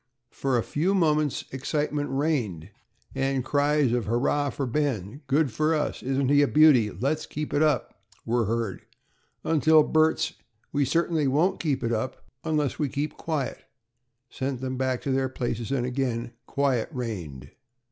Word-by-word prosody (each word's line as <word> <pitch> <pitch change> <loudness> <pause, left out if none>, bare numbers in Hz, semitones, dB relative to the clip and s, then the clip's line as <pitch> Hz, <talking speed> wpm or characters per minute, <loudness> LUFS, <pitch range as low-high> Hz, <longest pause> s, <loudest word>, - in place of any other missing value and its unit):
For 135 -2 0
a 115 - +1
few 180 +7 0
moments 155 -5 +1
excitement 145 +2 -2
reigned, 135 - -1 0.4
and 135 -1 -1
cries 145 -2 +2
of 120 -3 0
"Hurrah 140 +5 +1
for 135 - -3
Ben," 130 - -2
"good 140 0 +2
for 155 +7 +1
us," 150 - -2
"isn't 135 0 0
he 145 0 +5
a 145 - +4
beauty?" 145 -9 +5
"let's 145 +8 -2
keep 150 0 -5
it 145 - +2
up," 145 -9 0 0.2
were 120 0 +1
heard, 115 -2 -2 0.6
until 155 0 +5
Bert's 160 +1 +2 0.4
"We 145 -1 +1
certainly 160 +1 +1
won't 155 +8 +2
keep 140 -5 -1
it 115 0 0
up 115 +4 -3 0.2
unless 150 -3 -1
we 150 -3 0
keep 145 +3 -3
quiet," 155 -5 -3 0.7
sent 130 -1 -4
them 130 0 -3
back 130 -1 -1
to 140 - -2
their 130 0 +1
places 120 -2 -3
and 130 -3 0
again 125 -2 -2 0.2
quiet 135 -5 0
reigned. 85 - -6
135 Hz, 155 wpm, -26 LUFS, 120-150 Hz, 0.7 s, he